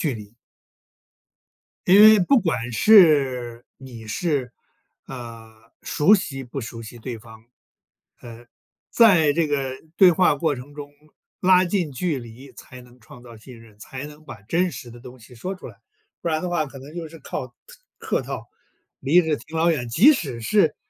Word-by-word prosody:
距 110 Hz, -, -9 dB
离。 105 Hz, +2 st, -15 dB, 1.5 s
因 190 Hz, +3 st, +7 dB
为 215 Hz, 0 st, +8 dB
不 235 Hz, +8 st, +3 dB
管 125 Hz, -, -3 dB
是， 130 Hz, -, +4 dB
你 120 Hz, -4 st, -12 dB
是， 130 Hz, -, -2 dB, 0.5 s
啊， 115 Hz, -3 st, -10 dB, 0.3 s
熟 175 Hz, +8 st, +3 dB
悉 135 Hz, -8 st, -5 dB
不 130 Hz, +2 st, -7 dB
熟 115 Hz, +1 st, -8 dB
悉 115 Hz, +2 st, -11 dB
对 115 Hz, 0 st, -7 dB
方， 110 Hz, 0 st, -16 dB, 0.8 s
呃， 120 Hz, 0 st, -12 dB, 0.4 s
在 175 Hz, -11 st, +4 dB
这 165 Hz, -1 st, 0 dB
个 135 Hz, -3 st, -2 dB, 0.2 s
对 190 Hz, -, +7 dB
话 180 Hz, -2 st, +3 dB
过 145 Hz, 0 st, -1 dB
程 130 Hz, +4 st, -11 dB
中， 145 Hz, -1 st, -10 dB, 0.5 s
拉 185 Hz, 0 st, +4 dB
近 175 Hz, -5 st, -2 dB
距 145 Hz, +1 st, -3 dB
离 120 Hz, +4 st, -13 dB
才 125 Hz, -1 st, -13 dB
能 125 Hz, 0 st, -20 dB
创 120 Hz, +2 st, -15 dB
造 120 Hz, -2 st, -14 dB
信 115 Hz, +2 st, -14 dB
任， 110 Hz, -2 st, -19 dB
才 135 Hz, +6 st, -8 dB
能 150 Hz, +1 st, -15 dB
把 120 Hz, -8 st, -12 dB
真 175 Hz, -, 0 dB
实 120 Hz, -7 st, -10 dB
的 120 Hz, -, -14 dB
东 125 Hz, +1 st, -13 dB
西 120 Hz, +2 st, -16 dB
说 185 Hz, +11 st, -6 dB
出 -, -, -11 dB
来。 -, -, -13 dB, 0.5 s
不 170 Hz, -, -2 dB
然 155 Hz, -1 st, -1 dB
的 180 Hz, -, -4 dB
话 175 Hz, -3 st, -1 dB
可 135 Hz, 0 st, -12 dB
能 145 Hz, +5 st, -13 dB
就 165 Hz, -2 st, -6 dB
是 165 Hz, +1 st, -14 dB
靠 -, -, -6 dB
客 -, -, -30 dB, 0.4 s
客 -, -, -2 dB
套， -, -, -7 dB, 0.5 s
离 160 Hz, +6 st, +3 dB
着 160 Hz, -3 st, -1 dB
挺 160 Hz, +3 st, -9 dB
老 165 Hz, +1 st, +2 dB
远。 125 Hz, -7 st, -2 dB
即 225 Hz, -, +6 dB
使 135 Hz, -, -5 dB
是， 155 Hz, -, +1 dB
135 Hz, 190 characters per minute, -22 LUFS, 120-170 Hz, 1.5 s, 为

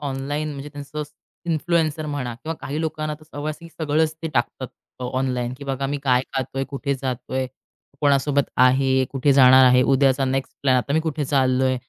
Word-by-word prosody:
Online 145 Hz, +2 st, -3 dB
म्हणजे 140 Hz, 0 st, -7 dB
त्यांचं 145 Hz, +1 st, -7 dB
असं 150 Hz, 0 st, -12 dB, 0.4 s
इन्फ्लुएन्सर 160 Hz, -1 st, 0 dB
म्हणा 135 Hz, -5 st, -3 dB
किंवा 160 Hz, +7 st, -5 dB
काही 145 Hz, +2 st, -4 dB
लोकांना 155 Hz, -1 st, -2 dB
तर -, -, -16 dB
सवय 150 Hz, 0 st, -5 dB
असेल 165 Hz, +2 st, -9 dB
की 165 Hz, -, -9 dB
सगळंच 155 Hz, +1 st, +1 dB
ते 165 Hz, -, -2 dB
टाकतात 130 Hz, +1 st, -1 dB, 0.3 s
अ, -, -, -3 dB
ऑनलाईन 125 Hz, -2 st, -1 dB
की 140 Hz, -, -8 dB
"बघा 135 Hz, 0 st, -2 dB
मी 145 Hz, +1 st, -2 dB
काय 125 Hz, -2 st, +3 dB
खातोय, 135 Hz, +1 st, -2 dB
कुठे 140 Hz, +1 st, -3 dB
जातोय, 130 Hz, 0 st, -3 dB, 0.5 s
कोणासोबत 140 Hz, 0 st, +3 dB
आहे, 130 Hz, +1 st, +4 dB
कुठे 140 Hz, +1 st, +2 dB
जाणार 130 Hz, -1 st, +7 dB
आहे. 125 Hz, 0 st, +6 dB
उद्याचा 135 Hz, 0 st, +3 dB
नेक्स्ट 135 Hz, 0 st, -2 dB
प्लॅन 130 Hz, -2 st, +4 dB
आता 125 Hz, +3 st, -1 dB
मी 160 Hz, -, +3 dB
कुठे 155 Hz, -2 st, -2 dB
चाललोय," 130 Hz, -1 st, +2 dB
140 Hz, 185 wpm, -22 LUFS, 130-150 Hz, 0.5 s, जाणार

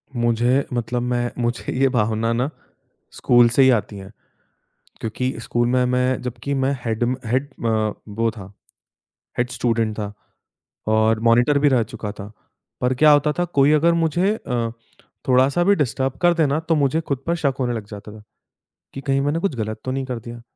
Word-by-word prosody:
मुझे 120 Hz, +3 st, +2 dB
मतलब 120 Hz, 0 st, -2 dB
मैं 120 Hz, 0 st, -1 dB
मुझे 120 Hz, 0 st, -2 dB
ये 135 Hz, -1 st, +4 dB
भावना 115 Hz, -1 st, 0 dB
ना 125 Hz, +5 st, 0 dB, 0.6 s
स्कूल 120 Hz, -1 st, +4 dB
से 135 Hz, +3 st, +4 dB
ही 130 Hz, -, +6 dB
आती 105 Hz, 0 st, -10 dB
है। 95 Hz, +1 st, -10 dB, 0.9 s
क्योंकि 125 Hz, +4 st, -2 dB
स्कूल 120 Hz, +1 st, 0 dB
में 125 Hz, 0 st, +2 dB
मैं 125 Hz, 0 st, +1 dB
जब 125 Hz, -1 st, -5 dB
कि 140 Hz, 0 st, -1 dB
मैं 135 Hz, +1 st, +1 dB
हेड 115 Hz, +1 st, -1 dB
म 125 Hz, +2 st, 0 dB
हेड 130 Hz, +5 st, 0 dB, 0.2 s
अ, 110 Hz, -2 st, +1 dB, 0.2 s
वो 115 Hz, +2 st, 0 dB
था, 100 Hz, -3 st, -11 dB, 0.9 s
हेड 125 Hz, 0 st, 0 dB
स्टूडेंट 115 Hz, -3 st, 0 dB
था। 105 Hz, -1 st, -4 dB, 0.8 s
और 110 Hz, 0 st, +2 dB
मॉनिटर 120 Hz, +5 st, +4 dB
भी 145 Hz, 0 st, +4 dB
रह 125 Hz, -4 st, +3 dB
चुका 105 Hz, -2 st, -6 dB
था। 105 Hz, +1 st, -10 dB, 0.5 s
पर 125 Hz, +1 st, +1 dB
क्या 150 Hz, +4 st, +5 dB
होता 145 Hz, +1 st, +3 dB
था 175 Hz, -, +2 dB
कोई 145 Hz, -4 st, +3 dB
अगर 165 Hz, +3 st, +4 dB
मुझे 170 Hz, +5 st, +1 dB
अ, 120 Hz, -, -3 dB, 0.6 s
थोड़ा-सा 130 Hz, +6 st, +3 dB
भी 200 Hz, +1 st, +5 dB
डिस्टर्ब 130 Hz, -1 st, -1 dB
कर 175 Hz, 0 st, +5 dB
दे 160 Hz, -3 st, +2 dB
ना 140 Hz, +3 st, 0 dB
तो 165 Hz, 0 st, 0 dB
मुझे 145 Hz, +2 st, +1 dB
खुद 140 Hz, -5 st, -3 dB
पर 170 Hz, -, +1 dB
शक 140 Hz, -5 st, 0 dB
होने 120 Hz, -1 st, 0 dB
लग 105 Hz, -3 st, -5 dB
जाता 105 Hz, 0 st, -9 dB
था। 110 Hz, -, -12 dB, 0.7 s
कि 135 Hz, -, -6 dB
कहीं 135 Hz, -1 st, 0 dB
मैंने 145 Hz, +4 st, 0 dB
कुछ 170 Hz, -7 st, -1 dB
ग़लत 110 Hz, -1 st, -4 dB
तो 130 Hz, -, -2 dB
नहीं 135 Hz, 0 st, -2 dB
कर 125 Hz, -2 st, -4 dB
दिया। 120 Hz, +1 st, -10 dB
125 Hz, 195 wpm, -21 LUFS, 115-140 Hz, 0.9 s, ही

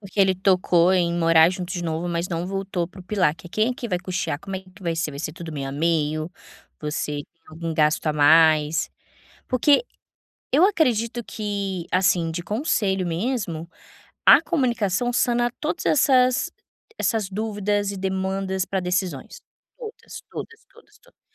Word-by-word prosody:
Porque 195 Hz, 0 st, -11 dB
ele 190 Hz, -1 st, +4 dB
tocou 185 Hz, -1 st, +3 dB
em 175 Hz, -2 st, +2 dB
ir -, -, -1 dB
morar 165 Hz, -1 st, +6 dB
junto 180 Hz, -1 st, -5 dB
de 175 Hz, -2 st, -3 dB
novo, 165 Hz, +2 st, -2 dB
mas 170 Hz, +1 st, -2 dB
não 170 Hz, 0 st, -3 dB
voltou 195 Hz, -3 st, -3 dB
para 190 Hz, 0 st, -13 dB
o -, -, -10 dB
pilar, 185 Hz, -6 st, +1 dB
que 170 Hz, -, -13 dB
é, -, -, -13 dB
quem 215 Hz, +4 st, +1 dB
é -, -, -3 dB
que 240 Hz, -3 st, -6 dB
vai 180 Hz, -2 st, 0 dB
custear, 180 Hz, -5 st, -3 dB
como 195 Hz, +1 st, -5 dB
é -, -, -6 dB
que 190 Hz, +1 st, -19 dB
vai 170 Hz, -2 st, -1 dB
ser, 165 Hz, -2 st, -1 dB
vai 140 Hz, -, -6 dB
ser 155 Hz, -, -4 dB
tudo 170 Hz, -1 st, -8 dB
meio 140 Hz, -2 st, -4 dB
a -, -, -5 dB
meio, 155 Hz, +1 st, 0 dB, 0.5 s
você 150 Hz, -1 st, -3 dB
tem 165 Hz, -, -46 dB
algum 165 Hz, +1 st, -5 dB
gasto 150 Hz, 0 st, +2 dB
a -, -, +2 dB
mais, 155 Hz, +1 st, +4 dB, 0.6 s
porque 280 Hz, -, +3 dB, 0.7 s
eu 305 Hz, +6 st, +5 dB
acredito 240 Hz, -, +1 dB
que, 200 Hz, -4 st, -4 dB
assim, 180 Hz, -3 st, +2 dB
de 170 Hz, +2 st, -4 dB
conselho 205 Hz, -, 0 dB
mesmo, 170 Hz, -3 st, -2 dB, 0.6 s
a -, -, +9 dB
comunicação 245 Hz, -, 0 dB
sana 240 Hz, 0 st, +2 dB
todas 315 Hz, +4 st, -3 dB
essas 255 Hz, -4 st, +3 dB, 0.5 s
essas 220 Hz, -, 0 dB
dúvidas 205 Hz, 0 st, -1 dB
e 200 Hz, -, -6 dB
demandas 190 Hz, 0 st, -2 dB
pra 195 Hz, -, -2 dB
decisões, 180 Hz, -5 st, -3 dB, 0.4 s
todas 460 Hz, -3 st, -9 dB
todas 455 Hz, 0 st, -8 dB
todas 465 Hz, -, -21 dB
todas. -, -, -26 dB
185 Hz, 175 wpm, -23 LUFS, 165-215 Hz, 0.7 s, a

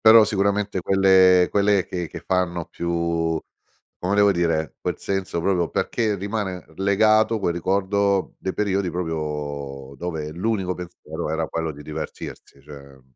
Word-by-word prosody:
Però 110 Hz, 0 st, +10 dB
sicuramente 100 Hz, -1 st, 0 dB
quelle 95 Hz, -1 st, +5 dB
quelle 100 Hz, -2 st, +3 dB
che 90 Hz, -2 st, -4 dB
che 85 Hz, +1 st, -9 dB
fanno 90 Hz, -2 st, 0 dB
più 85 Hz, -1 st, -1 dB, 0.6 s
come 90 Hz, +2 st, -1 dB
devo 100 Hz, 0 st, +5 dB
dire, 80 Hz, -4 st, 0 dB
quel -, -, -3 dB
senso 95 Hz, -3 st, -2 dB
proprio 90 Hz, -2 st, +1 dB
perché 110 Hz, -3 st, 0 dB
rimane 100 Hz, -2 st, -3 dB
legato 110 Hz, +3 st, +3 dB
quel 85 Hz, -4 st, 0 dB
ricordo 100 Hz, +2 st, 0 dB
dei 95 Hz, -, -3 dB
periodi 100 Hz, -3 st, 0 dB
proprio 75 Hz, -5 st, -4 dB
dove 80 Hz, 0 st, -4 dB
l'unico 95 Hz, 0 st, -1 dB
pensiero 90 Hz, -3 st, -6 dB
era 80 Hz, 0 st, -1 dB
quello 80 Hz, -1 st, -2 dB
di 75 Hz, 0 st, -11 dB
divertirsi, 75 Hz, -2 st, -8 dB
cioè 70 Hz, -2 st, -13 dB
90 Hz, 135 wpm, -23 LUFS, 80-100 Hz, 0.6 s, Però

